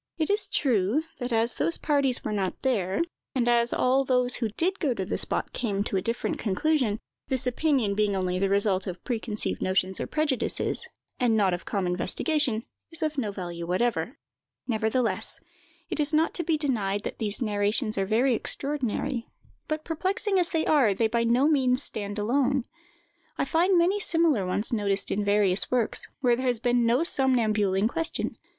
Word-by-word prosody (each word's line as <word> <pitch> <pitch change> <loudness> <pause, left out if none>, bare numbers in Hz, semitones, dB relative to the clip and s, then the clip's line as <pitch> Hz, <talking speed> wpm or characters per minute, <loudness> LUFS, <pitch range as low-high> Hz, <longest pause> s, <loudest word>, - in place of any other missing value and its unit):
It 315 +3 0
is 415 +1 +1
true, 240 +1 +1 0.2
that 245 -1 -4
as 230 +1 +2
those 155 +3 +1
parties 280 -4 +1
were - - -3
not 195 -3 -3
there, 205 - 0 0.3
and 245 -2 +1
as 235 0 +3
all 260 +2 +2
those 250 -1 +1
who 230 -3 -1
did 355 - -1
go 275 -7 0
to 190 - -3
the - - -3
spot - - -1
came 205 -5 -1
to 205 - -2
a 190 - +1
different 230 +4 -2
conclusion, 225 +1 0 0.3
this 260 -1 +1
opinion 250 -4 +1
being 205 -1 +1
only 185 -1 -1
the 195 0 +1
result 200 -1 +1
of 180 -1 -6
preconceived 225 -3 -2
notions 185 0 0
or - - -3
prejudices, 305 -4 0 0.3
and 235 -3 +2
not 195 -3 +2
of 175 - -5
calm 195 -3 -2
investigation, 230 - 0 0.2
is 330 -1 -4
of 310 -2 -1
no 215 -5 -2
value 175 -3 -6
whatever; 185 - -1 0.5
nevertheless, 225 +1 -1 0.5
it - - -3
is 300 +1 +2
not 320 +2 +2
to 345 - 0
be 320 -1 +1
denied 210 -9 -1
that - - -6
these 210 -2 0
narrations 215 0 +1
are 195 -1 -1
very 240 +5 +2
extraordinary; 265 0 -1 0.4
but, 310 0 -3
perplexing 380 +4 0
as 350 - +2
they 320 -1 0
are, 255 -10 +3
they 225 - +1
by 235 +1 0
no 240 +5 +3
means 265 -3 +2
stand 205 0 0
alone. 255 +4 +1 0.7
I - - 0
find 350 +6 +2
many 360 +4 +2
similar 325 - +2
ones 205 +6 +1
noticed 200 -2 0
in 205 - 0
various 200 -3 +2
works, 245 -3 0
where 245 -2 +3
there 255 +2 -3
has 245 -2 +1
been 240 0 +2
no 245 +7 +3
somnambule 225 - +2
in 200 +3 +2
question. 330 +6 -2
235 Hz, 185 wpm, -26 LUFS, 205-280 Hz, 0.7 s, as